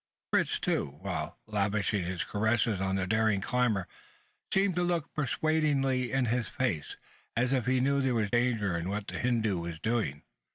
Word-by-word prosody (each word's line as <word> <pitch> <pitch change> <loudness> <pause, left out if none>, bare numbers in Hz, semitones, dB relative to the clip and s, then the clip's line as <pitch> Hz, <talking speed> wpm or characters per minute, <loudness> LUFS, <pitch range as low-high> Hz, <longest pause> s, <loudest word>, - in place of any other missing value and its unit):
Fritz, - - +2
too, 70 0 -1
while - - -3
lavishing 105 -2 0
his 90 0 -2
caresses 110 -1 +1
on 95 0 0
the 95 -1 0
daring 110 0 +2
climber, 110 -3 +1 0.6
seemed 195 0 +3
to 175 - 0
look 175 -3 -1
persuadingly 140 -3 +1
into 130 -3 +1
his 120 -1 0
face 115 - -2 0.4
as 125 +3 +2
if 125 -3 0
he 130 0 +3
knew 140 +2 +2
there 130 -2 +1
was 105 -3 0
danger 115 -6 +1
in 85 +2 -2
what 100 +1 -2
the - - -5
Hindoo 110 -6 +1
was 85 -1 -5
doing. 110 -10 -1
115 Hz, 170 wpm, -30 LUFS, 100-130 Hz, 0.6 s, seemed